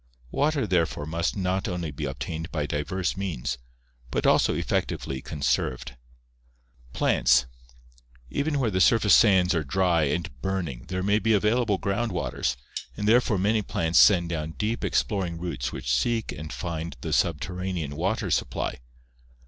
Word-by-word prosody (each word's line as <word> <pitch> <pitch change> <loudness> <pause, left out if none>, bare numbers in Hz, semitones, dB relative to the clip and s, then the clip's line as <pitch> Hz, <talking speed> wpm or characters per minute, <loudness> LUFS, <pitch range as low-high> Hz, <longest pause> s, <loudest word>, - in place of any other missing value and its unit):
Water 145 -3 +1
therefore 85 -6 0
must 85 +5 -1
not 95 0 -1
only 85 -4 -3
be 75 +1 -5
obtained 70 +5 -5
by 75 -3 -1
diverse 80 +5 -2
means, 75 -10 -3 0.5
but - - -1
also - - +4
effectively 65 -1 -2
con 75 0 -7
served. 70 - 0 1.0
Plants. 60 - +3 0.4
— - - -29 0.3
Even 145 +1 0
where 120 -5 +1
the 95 -1 +1
surface 110 -1 +5
sands 95 -4 +5
are 80 -3 0
dry 85 0 +2
and 70 -2 -3
burning 85 -9 -3
there 95 0 -3
may 100 +2 +3
be 115 0 +2
available 105 0 +2
ground 105 +4 -1
waters, 90 -7 -2 0.4
therefore 110 +1 +3
many 105 +4 +2
plants 85 -4 +1
send 90 -5 +6
down 80 -1 -3
deep 110 +3 -2
exploring 95 -5 0
roots 85 -8 -3
which - - -2
seek 115 - 0
and 75 +1 -7
find 85 -1 -5
the 80 - -3
subter 85 0 0
ranean 90 -5 -3
water - - -1
supply. - - -1
90 Hz, 150 wpm, -26 LUFS, 75-100 Hz, 1.0 s, send